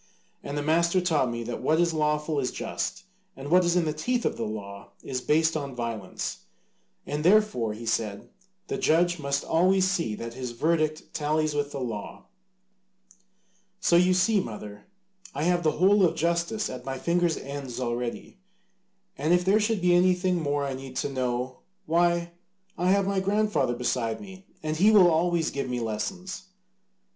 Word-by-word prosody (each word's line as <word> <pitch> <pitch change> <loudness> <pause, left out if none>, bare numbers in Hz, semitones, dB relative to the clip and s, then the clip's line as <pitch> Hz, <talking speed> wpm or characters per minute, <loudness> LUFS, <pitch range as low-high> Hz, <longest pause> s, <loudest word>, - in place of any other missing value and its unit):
And 140 +1 -5
the 145 - -1
master 170 +4 +3
taught 160 -8 +1
me 120 0 -4
that 120 +1 -5
what 160 +1 +2
is 170 -1 +2
lawful 150 -1 0
is 125 -2 0
just - - -4 0.3
and 140 +3 -7
what 180 +1 +6
is 175 0 +1
in 175 -2 +2
the 155 - -1
teeth 240 +11 -1
of - - -1
law 100 -3 -6
is 130 -2 -3
based 160 +4 +2
on 140 -4 -4
violence, 115 -5 -5 0.6
and 150 +1 -3
therefore, 180 - +3
he 115 +2 -8
said, 110 -3 -2 0.4
the - - -4
judge 175 -1 +2
must 140 -1 -1
always 185 +3 +3
see 170 - -1
that 115 +2 -7
his 125 -1 -5
verdict 155 +3 0
tallies 155 0 0
with 145 -1 -1
the 140 - -5
law. 115 -5 -6 1.5
So 170 - +3
you 180 +1 +5
see, 205 +3 +3
mother, 105 - -7 0.5
I 145 - -2
have 175 +1 +2
the 155 -2 +2
whole 195 +4 +4
of 175 - +3
justice 170 +6 0
at 130 - -7
my 135 0 -4
fingers' 170 +2 +1
ends 140 -3 -6
already. 120 - -4 0.8
And 155 +5 +3
if 180 0 0
there 200 +3 +4
should 215 -2 0
be 180 0 +4
anything 180 0 +3
more 145 -1 0
I 135 - -3
need 130 0 -8
to 145 - -1
know, 125 0 -2 0.3
why, 170 +1 +2 0.4
I 180 +2 0
have 195 0 +3
my 195 0 0
grandfather 200 - +1
beside 120 -2 -1
me, 190 -1 -12 0.2
and 155 0 -2
he 200 +6 +5
will 195 -5 +7
always 165 0 +1
give 140 -2 -3
me 125 -1 -2
lessons." 180 - -4
155 Hz, 175 wpm, -27 LUFS, 130-180 Hz, 1.5 s, will